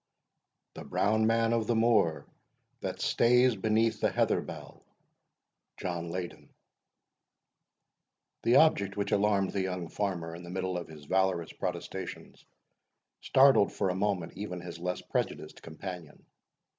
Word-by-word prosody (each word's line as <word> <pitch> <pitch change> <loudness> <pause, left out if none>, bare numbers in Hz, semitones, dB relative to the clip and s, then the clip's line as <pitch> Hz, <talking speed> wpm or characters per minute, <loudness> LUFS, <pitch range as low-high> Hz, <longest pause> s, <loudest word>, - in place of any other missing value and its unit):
"The - - -8
Brown 110 +2 +1
Man 115 0 +2
of 115 -2 0
the 120 - +2
Moor, 110 -8 +2 0.5
that - - -4
stays 125 0 +4
Beneath 110 +3 +1
the - - +3
heather - - +1
bell." - - -10 0.9
JOHN 85 -2 -4
LEYDEN 90 0 -6 1.9
The 120 - +3
object 100 -11 +4
which 100 - -2
alarmed 100 -1 +2
the 100 - -1
young 90 -3 -3
farmer 90 -5 -3
in 85 - -8
the 85 - -10
middle 95 0 -3
of 90 -1 -4
his 75 -2 -12
valorous 95 -1 0
protestations, - - -6 0.8
startled 135 -6 +5
for 95 - 0
a - - -3
moment 95 -3 -1
even 90 -4 -5
his 85 -1 -8
less 90 +1 -3
prejudiced - - -3
companion. 85 0 -9
95 Hz, 130 wpm, -30 LUFS, 90-110 Hz, 1.9 s, startled